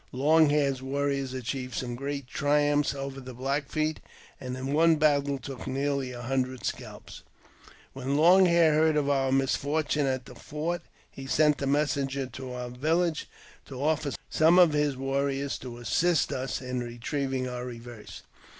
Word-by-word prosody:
Long 155 +4 +4
Hair's 140 -3 +1
warriors 140 0 -1
achieved 130 0 -4
some 125 -2 -3
great 140 +2 -4
triumphs 145 +1 +1
over 135 0 -5
the 130 -1 -9
Black 140 +3 -2
Feet, 155 0 -1 0.4
and 130 -1 -5
in 135 +2 -3
one 165 +2 +5
battle 145 -2 +2
took 130 0 -8
nearly 135 0 -1
a 120 -1 -8
hundred 130 0 -2
scalps. - - -6 0.7
When 135 +1 -2
Long 180 +4 +6
Hair 170 -2 +4
heard 155 0 +3
of 145 -1 +1
our 135 -1 +1
misfortune 145 +2 +1
at 130 -1 -2
the - - -11
fort, 165 +4 -4 0.3
he 135 0 -9
sent 150 +1 +3
a 140 - -1
messenger 140 -1 0
to 130 0 -8
our 125 0 -5
village 160 +6 0 0.4
to 130 -2 -8
offer 150 -1 0
some 160 +3 +4
of 175 -4 +6
his 150 -2 +1
warriors 135 +1 -1
to 125 -2 -8
assist 165 +7 +1
us 130 +1 -3
in 125 0 -3
retrieving 130 +2 -3
our 125 -1 -5
reverse. 120 -2 -9
140 Hz, 160 wpm, -28 LUFS, 130-150 Hz, 0.7 s, Long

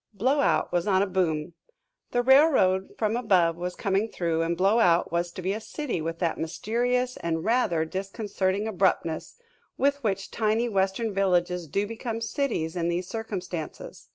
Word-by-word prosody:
Blowout 265 +8 +2
was 175 +2 0
on 190 -1 +3
a - - +1
boom. 175 -4 -1 0.6
The 245 0 0
railroad 260 -9 +4
from 215 0 0
above 185 -9 +3
was 180 +1 -4
coming 195 +2 0
through, 165 -4 -1
and 165 +1 -1
Blowout 190 -2 +3
was 170 0 -1
to 185 - -7
be 190 +2 0
a 215 - -4
city 265 - -4
with 165 +1 -3
that 170 -1 -1
mysterious 245 +9 -1
and 165 -1 -2
rather 215 -9 +1
disconcerting 195 +2 -2
abruptness 185 -5 0 0.4
with 280 0 +1
which 195 -3 -2
tiny 220 +2 +1
Western 200 +1 0
villages 180 -3 +1
do 200 +7 0
become 230 +1 -4
cities 225 - -2
in 170 -1 -1
these 175 +1 -1
circumstances. 185 -7 -6
195 Hz, 155 wpm, -26 LUFS, 175-225 Hz, 0.6 s, railroad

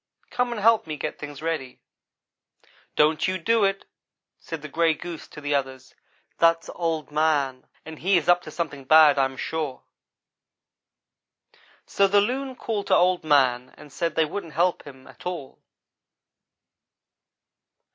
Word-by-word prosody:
Come 245 0 0
and 235 - -4
help 225 -2 +3
me 155 -1 -4
get - - -5
things 145 0 -8
ready. 160 -6 -3 0.6
' - - -34
"'Don't 155 +3 +3
you 185 0 -1
do 225 +5 +2
it,' 195 0 -1 0.5
said 165 -3 -7
the - - -5
gray 165 +1 +1
goose 170 0 -8
to - - -11
the 145 0 -2
others; 130 -2 -3 0.5
'that's 165 0 +3
Old 165 -3 -3
man 145 -4 0 0.2
and 160 -1 -9
he 190 +1 +3
is 165 - -2
up 175 0 +5
to 155 - -10
something 150 -4 -5
bad, 150 0 +6
I 135 - +4
am 135 0 -6
sure.' 155 -5 -4 2.0
"So 200 - +2
the 205 +1 +4
loon 260 +5 -2
called 215 -4 -4
to - - +4
Old 180 -1 +3
man 130 -4 +2
and 145 - -14
said 165 -2 -2
they 160 - +3
wouldn't 165 0 -6
help 175 0 0
him 130 -2 -13
at - - -10
all. 170 -7 -6
160 Hz, 155 wpm, -24 LUFS, 145-180 Hz, 2.0 s, bad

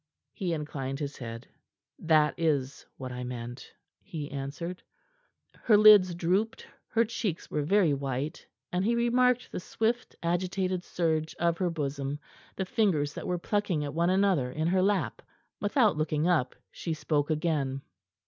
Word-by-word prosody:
He 185 -3 -2
inclined 135 -3 -4
his 145 -1 -4
head. 115 -2 -7 0.5
"That 155 -2 +3
is 145 -5 -1
what 130 -1 -6
I 125 0 -5
meant," 120 0 -7 0.3
he 150 -4 -6
answered. 145 +6 -5 0.7
Her 215 -3 +3
lids 205 -4 +8
drooped; 185 +6 0 0.2
her 230 +1 +2
cheeks 215 -6 -3
were 150 - 0
very 170 0 +3
white, 140 +3 -3 0.2
and 180 +1 0
he 230 +4 +2
remarked 250 +1 +2
the - - -3
swift, 225 +6 -2
agitated 185 +1 0
surge 160 -3 -1
of 170 0 0
her 180 -2 +1
bosom, 140 -3 -3 0.4
the 190 - -2
fingers 170 -8 +1
that - - -6
were 180 -1 0
plucking 180 -4 -1
at 145 - -5
one 170 +2 +2
another 185 -9 +2
in 155 +4 -2
her 185 +1 +3
lap. 200 +1 0 0.4
Without 210 - +3
looking 155 +1 0
up, 165 -8 +2 0.2
she 165 -2 -4
spoke 145 -1 0
again. 150 -4 -1
165 Hz, 150 wpm, -29 LUFS, 145-190 Hz, 0.7 s, lids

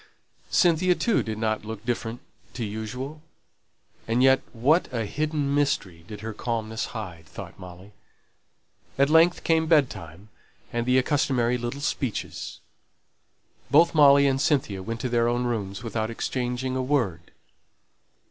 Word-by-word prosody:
Cynthia 180 +1 +3
too 230 +2 +1
did 110 -1 -4
not 110 -1 -1
look 110 0 -7
different 120 0 -3 0.3
from 120 - -3
usual. 125 +8 -6 0.9
And 115 +3 +2
yet 135 0 +5
what 140 +9 +2
a 115 -3 -2
hidden 150 +3 -1
mystery 120 -13 0
did 105 -1 -8
her 110 0 -5
calmness 110 -1 -3
hide! 85 -7 -8
thought - - -10
Molly. 90 +2 -11 1.1
At 140 +2 +3
length 165 +2 +5
came 160 -1 +2
bed 150 -5 +4
time, 85 +2 -11 0.4
and 120 0 -1
the 130 +1 +5
customary 125 -4 +1
little 120 +4 -4
speeches. 135 -5 -3 1.1
Both 165 +5 +5
Molly 140 -2 +7
and 135 -1 +2
Cynthia 130 -11 +1
went 115 +4 -5
to 130 - -2
their 120 -1 +2
own 120 +1 0
rooms 105 -3 -3
without 110 -1 -2
exchanging 125 +2 -2
a 130 - 0
word. 120 - -1
120 Hz, 140 wpm, -25 LUFS, 110-140 Hz, 1.1 s, Molly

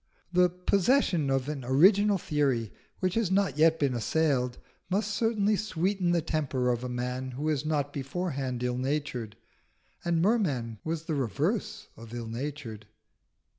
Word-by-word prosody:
The 180 0 +5
possession 180 - +2
of 135 0 0
an 145 -3 -4
original 195 - +5
theory 140 - 0 0.3
which 185 -1 +1
has 225 -4 +1
not 190 -5 +1
yet 160 +1 +5
been 140 -4 +1
assailed 125 0 0 0.3
must 205 +2 0
certainly 215 -1 +2
sweeten 190 -2 0
the 170 -2 +1
temper 145 -6 0
of 120 0 -2
a 125 - -3
man 125 +1 -3
who 140 +5 -3
is 150 -1 -1
not 145 -2 -1
beforehand 135 -4 -3
ill 125 0 -1
natured. 130 -5 -2 0.7
And 170 -1 +1
Merman 150 - +1
was 160 0 -3
the 165 - -3
reverse 130 -8 -1
of 115 +1 -10
ill 120 -1 -4
natured. 115 -3 -6
150 Hz, 150 wpm, -29 LUFS, 125-180 Hz, 0.7 s, The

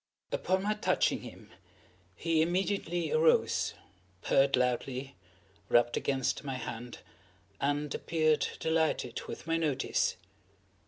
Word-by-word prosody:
Upon 190 - 0
my 210 +1 +1
touching 210 - +1
him, - - -12 0.6
he 165 - +1
immediately 175 -1 0
arose, 160 +1 +3 0.5
purred 135 0 +4
loudly, 125 +1 -1 0.5
rubbed 120 0 +4
against 135 -2 0
my 135 -2 -3
hand, 120 -1 -6 0.6
and 145 +1 0
appeared 155 -3 +1
delighted 160 -6 0
with - - -7
my 165 0 +1
notice. 150 -5 0
150 Hz, 105 wpm, -31 LUFS, 130-165 Hz, 0.6 s, purred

